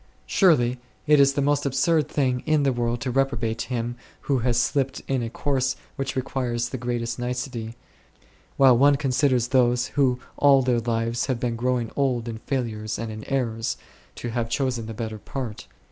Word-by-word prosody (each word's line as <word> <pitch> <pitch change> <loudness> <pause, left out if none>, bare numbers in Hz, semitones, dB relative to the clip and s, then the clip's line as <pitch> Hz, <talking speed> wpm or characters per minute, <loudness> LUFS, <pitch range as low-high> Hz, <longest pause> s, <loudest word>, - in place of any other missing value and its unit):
Surely 130 - +3 0.3
it 150 -1 +5
is 140 0 +5
the 140 - 0
most 145 0 +2
absurd 140 +2 +2
thing 130 -3 +1
in 155 -2 +3
the 135 -2 +2
world 120 0 -1
to 130 0 -3
reprobate 120 -4 0
him 120 -1 -3 0.3
who 135 -2 0
has 120 0 +1
slipped 135 +2 0
in 135 -2 0
a 115 - -3
course 130 +1 0 0.2
which 135 0 -3
requires 125 -3 -2
the 130 - -4
greatest 120 0 -3
nicety, 120 -2 -4 0.8
while 135 -2 +7
one 140 +4 +5
considers 130 -3 +1
those 125 -1 +2
who 130 -3 +2 0.2
all 140 -2 +5
their 125 -2 +2
lives 115 +1 -1
have 130 -3 -1
been 120 -1 -1
growing 120 -1 -1
old 125 -4 0
in 110 -1 -5
failures 115 -5 -3
and 115 -1 -4
in 110 0 -7
errors, 115 -4 -1 0.4
to 120 - -5
have 115 -1 -2
chosen 125 -2 -1
the 115 - -6
better 110 -1 -5
part. 125 -3 -6
125 Hz, 175 wpm, -24 LUFS, 115-135 Hz, 0.8 s, while